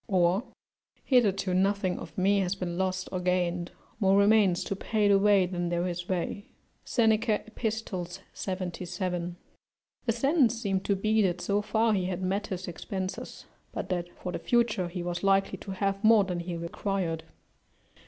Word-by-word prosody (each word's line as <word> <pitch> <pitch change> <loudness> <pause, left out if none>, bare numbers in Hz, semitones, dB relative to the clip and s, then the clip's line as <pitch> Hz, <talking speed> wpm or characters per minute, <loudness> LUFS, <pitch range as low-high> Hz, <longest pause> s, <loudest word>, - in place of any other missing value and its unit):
(Or): 185 +2 +2 0.6
"Hitherto 200 -7 +3
nothing 190 0 +1
of 160 - -10
me 200 +2 +3
has 185 0 0
been 180 -3 -4
lost 185 0 -1
or 185 - -2
gained; 180 -1 0 0.3
more 195 -2 +4
remains 200 -3 +4
to 195 - -3
pay 210 +1 +1
the 200 -1 +5
way 200 -2 +5
than 175 -1 -2
there 175 +1 0
is 175 0 -5
way." 185 +2 -2 0.4
Seneca, 225 -1 +2
Ep., 225 - -16 0.7
77. 180 -1 -3 0.7
(The - - +4
sense 245 -1 +2
seems 195 -4 0
to 200 - +1
be 215 +3 +2
that 180 -3 +1
so 200 +3 0
far 220 +1 +2
he 190 -3 +1
had 185 0 -3
met 195 +3 -1
his 185 -1 -5
expenses, 185 +2 -5 0.3
but - - -4
that 175 -2 -1
for 180 - -5
the - - -4
future 235 -6 +1
he 175 0 -5
was 175 0 -3
likely 195 0 +2
to - - -10
have 195 +1 -1
more 220 -1 +7
than 180 -2 -3
he 170 0 -4
required.) 170 -1 -2
190 Hz, 165 wpm, -28 LUFS, 180-205 Hz, 0.7 s, more